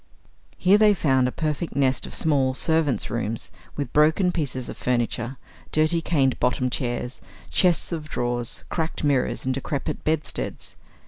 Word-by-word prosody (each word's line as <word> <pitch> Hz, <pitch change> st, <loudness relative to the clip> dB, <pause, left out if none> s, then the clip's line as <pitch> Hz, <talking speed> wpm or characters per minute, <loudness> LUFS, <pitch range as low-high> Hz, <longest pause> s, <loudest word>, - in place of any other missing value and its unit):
Here 195 Hz, +3 st, +4 dB
they 210 Hz, -1 st, +5 dB
found 130 Hz, -7 st, +2 dB
a -, -, -2 dB
perfect 155 Hz, 0 st, -3 dB
nest 135 Hz, -1 st, +1 dB
of -, -, -3 dB
small 135 Hz, -4 st, +2 dB
servants' 160 Hz, -7 st, +1 dB
rooms, 115 Hz, -1 st, -1 dB, 0.2 s
with 140 Hz, -4 st, -4 dB
broken 160 Hz, +5 st, +4 dB
pieces 135 Hz, -7 st, -3 dB
of -, -, -6 dB
furniture, 120 Hz, 0 st, -1 dB, 0.3 s
dirty 155 Hz, +2 st, +2 dB
cane 140 Hz, -6 st, +2 dB
bottomed 125 Hz, 0 st, +1 dB
chairs, 120 Hz, 0 st, -3 dB, 0.3 s
chests 180 Hz, -2 st, +2 dB
of 155 Hz, -2 st, -4 dB
drawers, 120 Hz, -2 st, -1 dB
cracked 160 Hz, -2 st, -3 dB
mirrors, 140 Hz, -4 st, +1 dB
and 130 Hz, -, +1 dB
decrepit 140 Hz, +3 st, -3 dB
bedsteads. 155 Hz, -1 st, -2 dB
140 Hz, 145 wpm, -24 LUFS, 125-160 Hz, 0.3 s, they